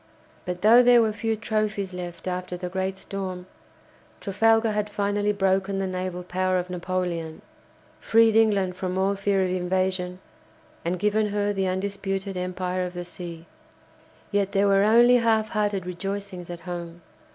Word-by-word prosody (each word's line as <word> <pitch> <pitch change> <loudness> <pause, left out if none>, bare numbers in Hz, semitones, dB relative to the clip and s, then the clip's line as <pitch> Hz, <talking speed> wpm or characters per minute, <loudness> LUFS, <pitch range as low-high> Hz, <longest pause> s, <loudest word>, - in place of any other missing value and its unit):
But 180 0 -5
though 230 +3 +8
there 245 -1 +6
were 220 -2 +2
few 225 +1 -1
trophies 215 -3 -2
left 175 0 -7
after 180 0 -3
the 180 0 -5
great 190 +1 -2
storm, 190 -2 -6 0.7
Trafalgar 225 +2 +2
had 210 0 -1
finally 205 0 0
broken 195 -1 +1
the 195 - -1
naval 185 -1 -4
power 185 +1 0
of 180 0 -3
Napoleon, 175 -3 -3 0.6
freed 225 -1 +4
England 200 -5 +3
from 185 0 -3
all 195 +1 +2
fear 195 -1 +1
of 185 - -1
invasion, 185 0 -1 0.7
and 175 +2 -1
given 210 +3 +1
her 205 0 0
the 195 -1 0
undisputed 195 +1 -3
empire 180 0 -2
of 180 0 -5
the 175 0 -5
sea. 170 -2 -8 0.9
Yet 200 -1 0
there 200 0 +3
were 195 -1 +4
only 235 +4 +6
half 220 -2 +2
hearted 205 -4 -1
rejoicings 195 0 -5
at 175 -1 -7
home. 175 -1 -7
190 Hz, 155 wpm, -25 LUFS, 180-205 Hz, 0.9 s, though